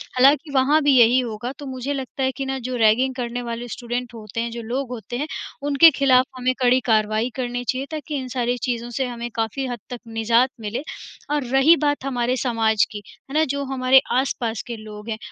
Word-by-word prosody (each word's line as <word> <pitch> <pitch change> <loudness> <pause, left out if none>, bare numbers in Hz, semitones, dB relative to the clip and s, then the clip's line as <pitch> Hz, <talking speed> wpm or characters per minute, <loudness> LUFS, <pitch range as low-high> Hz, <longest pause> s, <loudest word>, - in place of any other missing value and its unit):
हालाँकि 285 +4 +4
वहाँ 280 +4 +4
भी 285 -2 +4
यही 240 +2 +6
होगा। 240 0 -4
तो 290 - -7
मुझे 260 +1 -4
लगता 265 -1 -4
है 260 - +2
कि 270 - -3
ना 265 0 -2
जो 255 - -2
रैगिंग 245 +3 +3
करने 245 -1 -3
वाले 235 0 -5
स्टूडेंट 245 +1 -5
होते 220 -1 -7
हैं, 235 0 -3
जो 235 0 -6
लोग 250 +3 -3
होते 240 0 -6
हैं 295 +4 -2 0.4
उनके 290 +3 +7
ख़िलाफ़ 260 -3 +4
हमें 255 0 +1
कड़ी 255 0 +4
कार्रवाई 215 +1 +2
करनी 245 -1 -3
चाहिए 260 +1 -1
ताकि 305 -1 -4
इन 260 - -6
सारी 245 -1 -1
चीज़ों 240 -1 -2
से 265 - +1
हमें 240 -1 -5
काफ़ी 225 +4 -2
हद 245 -2 -5
तक 245 -1 -6
निजात 230 +3 +2
मिले। 215 +4 -3 0.5
और 295 -2 0
रही 270 +5 +6
बात 290 -2 0
हमारे 250 -2 0
समाज 225 -4 +2
की, 210 - -6 0.3
है - - -8
ना, 310 +1 +3
जो 280 -1 -2
हमारे 260 0 +5 0.2
आस-पास 235 -4 -1
के 240 - -4
लोग 215 0 -10
हैं, 220 - -2
250 Hz, 210 wpm, -22 LUFS, 235-270 Hz, 0.5 s, उनके